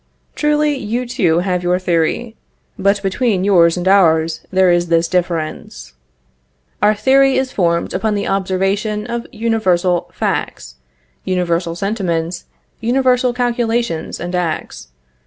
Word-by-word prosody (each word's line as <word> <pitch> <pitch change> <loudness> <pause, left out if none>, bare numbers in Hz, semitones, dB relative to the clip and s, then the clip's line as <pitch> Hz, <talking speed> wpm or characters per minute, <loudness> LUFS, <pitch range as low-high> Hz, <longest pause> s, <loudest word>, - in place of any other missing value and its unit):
Truly, 300 0 +1
you 245 +1 -3
too 190 - +1
have 180 -1 -1
your 180 0 +1
theory; 180 +6 -1 0.4
but 200 +1 +1
between 195 0 0
yours 175 -4 +4
and 180 +1 -2
ours 165 -4 +3
there 185 -1 +3
is 175 0 +1
this 165 0 +2
difference: 170 - -3 0.9
Our 210 +1 +4
theory 270 +4 +3
is 260 -1 -1
formed 170 -3 0
upon 210 +3 -1
the 200 - -2
observation 195 +2 -1
of 235 0 -4
universal 185 -6 0
facts, 60 - -3 0.5
universal 170 -2 -1
sentiments, 175 -4 -2 0.3
universal 250 +1 +2
calculations 235 -6 -1
and 175 +1 -5
acts. 175 - -3
190 Hz, 120 wpm, -17 LUFS, 175-230 Hz, 0.9 s, yours